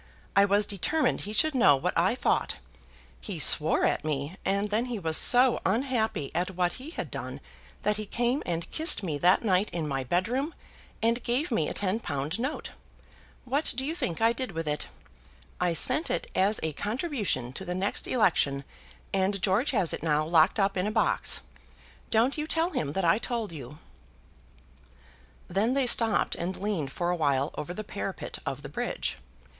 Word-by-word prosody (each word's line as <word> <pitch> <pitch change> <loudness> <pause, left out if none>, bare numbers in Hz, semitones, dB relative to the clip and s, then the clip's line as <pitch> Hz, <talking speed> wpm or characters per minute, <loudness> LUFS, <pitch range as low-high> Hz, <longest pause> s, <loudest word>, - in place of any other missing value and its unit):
I 200 0 +6
was 205 +1 +3
determined 295 - 0
he 205 - -6
should 310 +7 +2
know 225 - +5
what 135 - -2
I - - +2
thought. - - 0 0.6
He - - -6
swore - - +5
at - - 0
me; 150 +2 -3
and 200 +2 0
then 225 +4 +1
he 245 -2 -4
was 165 -5 -1
so 250 +5 +6
unhappy 220 - 0
at 180 +3 -2
what 175 -1 +1
he 285 - -7
had 335 - -6
done - - -6 0.4
that 210 0 +1
he 215 -1 -5
came 240 +6 0
and 170 -1 -3
kissed 320 - +3
me 155 -6 -2
that 180 +7 +4
night 195 -1 +2
in 165 -3 -3
my 135 -2 -2
bedroom, 235 - -1 0.5
and 230 +2 +2
gave 255 +7 -1
me 160 -10 +1
a - - -4
ten 200 +2 0
pound 150 -1 -3
note. 265 +5 -3 0.7
What 275 +5 +1
do 265 - -1
you 310 - -1
think 185 - -3
I 225 +1 +4
did 255 -4 -5
with 165 -1 -4
it? 150 0 -2 0.7
I 180 -1 +1
sent 305 - +3
it - - -3
as 200 +3 +2
a 160 -1 -1
contribution 210 - -2
to 190 - -6
the 180 -1 -4
next 195 +2 -2
election 145 - +2 0.5
and 195 +1 +1
George 200 +9 +1
has 195 - +1
it - - -4
now 155 -1 +1
locked 165 +4 +3
up 195 0 +1
in 185 +3 0
a - - -1
box. 215 0 +2 0.7
Don't 240 +7 +2
you 300 - -2
tell 330 +2 +1
him 150 - -2
that 190 0 -1
I 170 +5 +4
told 235 -5 -3
you." 150 -2 -9 1.7
Then 210 +8 0
they 275 -2 +2
stopped 230 -3 +3
and 180 +2 -3
leaned 190 -9 -2
for 175 +4 -1
a - - 0
while 140 -3 0
over 160 - -5
the 215 +4 -5
parapet - - -6
of - - -4
the - - -7
bridge. - - -3
200 Hz, 185 wpm, -28 LUFS, 165-240 Hz, 1.7 s, I